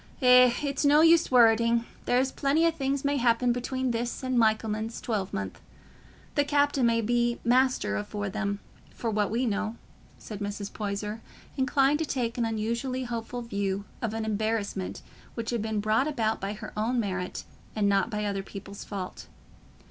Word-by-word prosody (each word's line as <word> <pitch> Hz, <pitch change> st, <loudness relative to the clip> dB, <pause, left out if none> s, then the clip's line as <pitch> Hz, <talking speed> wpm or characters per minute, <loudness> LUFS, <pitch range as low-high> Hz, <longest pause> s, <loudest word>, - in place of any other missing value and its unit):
"Eh, 250 Hz, -1 st, +7 dB
it's 280 Hz, -1 st, -1 dB
no 295 Hz, +1 st, +6 dB
use 330 Hz, 0 st, +5 dB
worreting; 230 Hz, -1 st, +4 dB, 0.2 s
there's 260 Hz, +2 st, +2 dB
plenty 295 Hz, +4 st, +2 dB
o' 335 Hz, -, +4 dB
things 275 Hz, -2 st, -2 dB
may 285 Hz, 0 st, +2 dB
happen 240 Hz, 0 st, +3 dB
between 255 Hz, +1 st, -2 dB
this 235 Hz, +3 st, -3 dB
and 255 Hz, 0 st, -1 dB
Michaelmas 220 Hz, 0 st, +1 dB
twelvemonth. 190 Hz, -, -3 dB, 0.7 s
The 290 Hz, -, +3 dB
captain 285 Hz, -3 st, +2 dB
may 230 Hz, 0 st, +2 dB
be 240 Hz, +1 st, +1 dB
master 250 Hz, -, +2 dB
afore 205 Hz, -, -4 dB
them, 200 Hz, 0 st, -3 dB, 0.3 s
for 230 Hz, -, -2 dB
what 210 Hz, -1 st, +1 dB
we 235 Hz, +4 st, 0 dB
know," 215 Hz, 0 st, -1 dB, 0.4 s
said 210 Hz, -3 st, -8 dB
Mrs. 205 Hz, 0 st, -5 dB
Poyser, 210 Hz, +1 st, -4 dB, 0.3 s
inclined 270 Hz, +2 st, +2 dB
to 320 Hz, -, 0 dB
take 245 Hz, -4 st, -2 dB
an 235 Hz, -, +2 dB
unusually 235 Hz, +4 st, -2 dB
hopeful 240 Hz, 0 st, -4 dB
view 200 Hz, -3 st, -2 dB, 0.2 s
of 225 Hz, -2 st, -2 dB
an 225 Hz, -1 st, -2 dB
embarrassment 215 Hz, -3 st, -2 dB, 0.3 s
which 230 Hz, 0 st, -3 dB
had 235 Hz, -2 st, -1 dB
been 220 Hz, -1 st, -1 dB
brought 215 Hz, +6 st, +2 dB
about 225 Hz, -7 st, -1 dB
by 195 Hz, +1 st, -2 dB
her 210 Hz, -, -9 dB
own 230 Hz, +4 st, 0 dB
merit 185 Hz, -4 st, -3 dB, 0.3 s
and 210 Hz, -2 st, +2 dB
not 195 Hz, +1 st, +2 dB
by 210 Hz, -2 st, -2 dB
other 200 Hz, -1 st, -1 dB
people's 200 Hz, 0 st, -9 dB
fault. 190 Hz, -3 st, -6 dB
230 Hz, 165 wpm, -28 LUFS, 210-255 Hz, 0.7 s, Eh